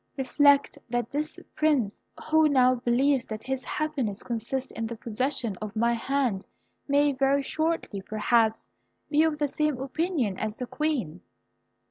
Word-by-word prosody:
Reflect 280 +1 +3
that 240 -1 -2
this 300 +2 -3 0.2
Prince, 285 -10 +1 0.3
who 315 -1 +5
now 255 -2 +5
believes 255 +2 +1
that 215 -1 -6
his 265 0 -3
happiness 275 -12 -2
consists 240 +3 -3
in 225 0 -4
the 235 - -5
possession 230 -1 -2
of 215 0 -7
my 235 +2 +2
hand 235 -4 0 0.4
may 285 0 +3
very 275 +1 +2
shortly 315 -9 -2
perhaps 220 +2 +1 0.4
be 300 0 +4
of 320 -1 +2
the 295 -1 +1
same 300 -1 0
opinion 270 - -1
as 215 0 -3
the 250 - -3
Queen." 245 - -2
260 Hz, 145 wpm, -27 LUFS, 225-290 Hz, 0.4 s, who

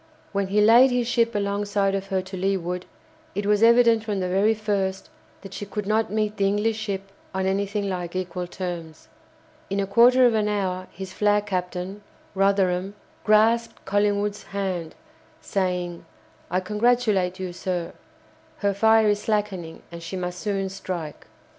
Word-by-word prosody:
When 200 -1 -1
he 205 +2 +2
laid 235 +5 +7
his 245 -1 0
ship 235 -2 +1
alongside 200 0 0
of 195 0 -2
her 190 -1 -1
to 190 +1 -8
leeward, 180 -1 -2 0.5
it 205 +1 -2
was 210 0 +2
evident 230 -1 +5
from 210 -3 -2
the 185 - -1
very 200 +4 +2
first 200 -3 -2 0.3
that 195 -1 -9
she - - -5
could 210 0 -4
not 215 +1 +1
meet 215 0 -1
the 195 - +2
English 210 +2 +1
ship 195 -2 -4 0.2
on 190 0 0
anything 200 +1 -1
like 180 -2 -4
equal 180 -1 -3
terms. 170 -3 -6 0.6
In 195 +1 -1
a 200 - +1
quarter 240 +6 +6
of 240 - +4
an 215 -1 +1
hour 185 -3 -2
his 190 -1 -8
flag 210 0 +2
captain, 185 0 -4 0.3
Rotherham, 195 -1 +1 0.3
grasped 225 +2 +3
Collingwood's 205 +1 0
hand, 185 -4 -3 0.4
saying: 180 -3 -2 0.5
"I 185 +2 0
congratulate 210 -3 +1
you, 185 -2 -4
sir. 175 -1 -3 0.6
Her 200 -1 0
fire 220 +2 +4
is 205 0 +1
slackening, 200 -6 -2
and 170 0 -8
she 170 +3 -6
must 180 0 -4
soon 195 -2 -2
strike." 180 -5 -6
195 Hz, 160 wpm, -24 LUFS, 185-210 Hz, 0.6 s, laid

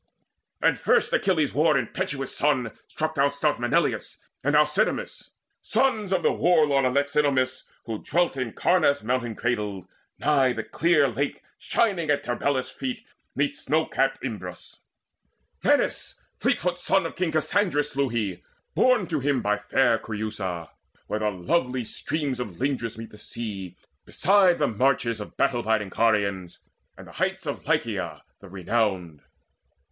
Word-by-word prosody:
And - - +3
first - - +2
Achilles' 160 -7 +2
war 155 0 +3
impetuous 135 +2 -3
son 130 -6 +1 0.2
Struck 155 0 -3
down 140 -1 +2
stout 145 +1 0
Melaneus 120 0 0 0.3
and 145 +3 +2
Alcidamas, 150 +8 +1 0.3
Sons 220 -7 +1
of 185 -3 +1
the - - +4
war 170 -3 +4
lord 140 -2 +2
Alexinomus, 140 -1 +1 0.2
Who 110 -3 -5
dwelt 175 -1 +1
in 130 -4 -3
Caunus 155 -6 +2
mountain 120 -1 -1
cradled, 105 -6 -2 0.3
nigh 135 -4 +3
The 115 - -4
clear 155 0 +3
lake 135 +4 -3 0.2
shining 195 -9 0
at 145 - +2
Tarbelus' 130 +2 -1
feet 250 -3 -5 0.3
'Neath - - 0
snow - - 0
capt - - 0
Imbrus. - - -7 0.8
Menes, 290 -1 +1 0.2
fleetfoot 180 -9 0
son 190 +2 +2
Of - - -5
King 180 -3 -1
Cassandrus, 155 -1 +1
slew 140 -1 0
he, 105 -6 -2 0.3
born 255 -6 +3
to 160 -3 -2
him 140 0 0
By 105 0 +1
fair 115 +3 +2
Creusa, 105 -6 -4 0.4
where 105 - -2
the 105 0 +1
lovely 125 - -1
streams 140 +3 -3
Of 105 -9 -5
Lindus 130 -5 -2
meet 115 0 -8
the 105 - -14
sea, 100 -6 -6 0.3
beside 190 -2 +3
the 145 - +2
marches 115 -1 +1
Of 105 - -10
battle 130 -3 +2
biding 110 -3 0
Carians, 100 -5 0 0.4
and - - -11
the - - -13
heights - - -2
Of - - -5
Lycia - - -1 0.2
the 100 - -13
renowned. 95 -4 -1
135 Hz, 145 wpm, -25 LUFS, 110-155 Hz, 0.8 s, the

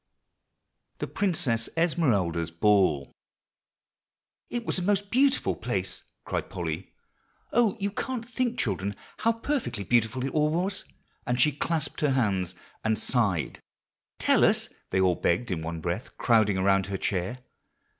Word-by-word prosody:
THE - - -2
PRINCESS 135 - 0
ESMERALDA'S 105 - +2
BALL. 85 -5 +2 1.4
"It 240 -1 -3
was - - +1
a - - -3
most 200 +2 0
beautiful 270 +3 +3
place," - - -3 0.2
cried - - -2
Polly. - - -4 0.6
"Oh! 230 -3 +3
you 200 0 -1
can't 235 +2 -3
think, 245 0 -1
children, 100 -2 -1 0.2
how 230 - +3
perfectly 230 - -2
beautiful 120 +3 +1
it 135 - -2
all 150 -1 +2
was;" 185 +5 -1 0.4
and 125 0 0
she 150 +4 +5
clasped 160 +3 -2
her 145 -3 +3
hands 95 -8 0 0.3
and 110 0 +2
sighed. 105 -10 0 0.6
"Tell - - +4
us," - - +3 0.2
they 95 - +1
all 95 -1 +4
begged 90 +6 0
in 85 -3 -1
one 80 0 -4
breath, 85 +7 -4
crowding 110 -5 +3
around 95 0 +3
her 100 0 -2
chair. 95 +7 -2
120 Hz, 140 wpm, -27 LUFS, -, 1.4 s, she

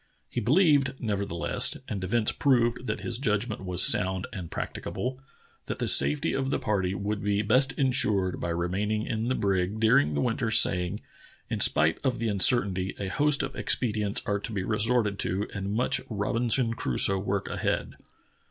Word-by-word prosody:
He 120 - -4
believed, 140 - +3
neverthe 100 -4 -3
less, 85 0 -1
and 100 -3 -5
events 105 +4 +1
proved 125 -2 +1
that - - -3
his 120 0 -2
judgment 110 -3 -2
was 90 -1 +3
sound 95 0 +2
and 90 -6 -7
practicable, 130 +1 -5 0.5
that - - -4
the - - -2
safety 150 +2 +4
of 135 0 -2
the - - 0
party 95 -3 -1
would 100 +2 -3
be 105 0 0
best 130 +6 +2
insured 105 -9 +1
by 85 - -3
remaining 100 +6 -2
in 110 0 -3
the 130 - 0
brig 95 +1 -1
during 75 -10 +3
the 70 - 0
winter, 115 0 -1
saj^ing: 95 -3 +3 0.5
In - - -2
spite 80 +2 +4
of 130 -3 0
the 115 -1 -2
uncertainty, 100 -2 +2
a 100 -2 -4
host 145 +8 +1
of 135 - -5
expedients 105 -4 0
are 100 -1 -1
to 105 - -7
be 100 -3 -3
resorted 105 0 0
to 100 +4 -2
and 100 -1 -4
much 115 +4 0
Robinson 115 +3 0
Crusoe 95 - +1
work 100 0 -2
ahead. - - -2
105 Hz, 170 wpm, -27 LUFS, 95-120 Hz, 0.5 s, safety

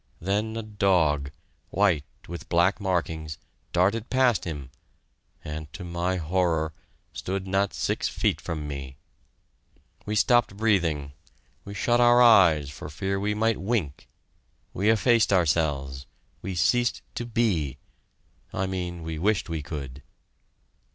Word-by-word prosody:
Then 105 +5 -1
a 115 - -3
dog, 90 -9 +1 0.4
white 90 -7 +2 0.2
with 85 -1 -8
black 85 +4 +3
markings, 80 -5 -2 0.3
darted 100 +6 +1
past 130 -5 +2
him, 75 -6 -6 0.7
and, 75 0 -6
to 90 +2 -7
my 85 +1 -1
horror, 85 -2 0 0.4
stood 95 +1 -3
not 95 +1 +1
six - - -1
feet - - 0
from 80 -3 -4
me. 70 -2 -7 1.1
We 105 - -1
stopped 120 -2 +3
breathing 85 -10 +1 0.5
we 100 - -8
shut 120 +4 +2
our 120 0 +6
eyes 85 - +6
for 70 - -8
fear 95 +5 -2
we 105 +1 -1
might 110 -1 +1
wink 90 - -2 0.6
we 100 +4 +1
effaced 115 0 +4
ourselves 75 -7 +1 0.3
we 95 - -4
ceased 120 +7 +1
to - - -4
be 105 - 0 0.7
I 95 - -1
mean 90 -3 -4
we 80 -1 -4
wished 100 0 +1
we 80 -2 -2
could. 70 -3 -7
90 Hz, 130 wpm, -26 LUFS, 80-105 Hz, 1.1 s, our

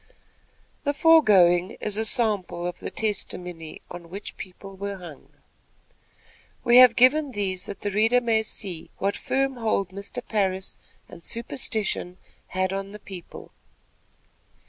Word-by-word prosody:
The 285 -1 0
foregoing 195 - +5
is 210 -1 -2
a 220 +1 0
sample 210 -7 +1
of 175 - -4
the - - -5
testimony 180 -6 -4
on 175 -1 -9
which 200 +4 -7
people 195 +1 -10
were 200 +1 -5
hung. 170 -6 -12 1.3
We 240 +1 +6
have 250 -2 +9
given 275 +2 +4
these, 190 -3 -1
that 200 - -7
the 205 - -2
reader 225 +5 +4
may 230 -2 +2
see 190 -6 -4
what 200 +1 -1
firm 270 -1 -1
hold 215 -5 0
Mr. 200 +5 -6
Parris 190 -3 -1 0.3
and 170 - -13
superstition 220 -6 -2 0.3
had 185 0 -1
on 195 +1 -4
the 210 - -9
people. 185 -4 -10
200 Hz, 135 wpm, -25 LUFS, 185-230 Hz, 1.3 s, have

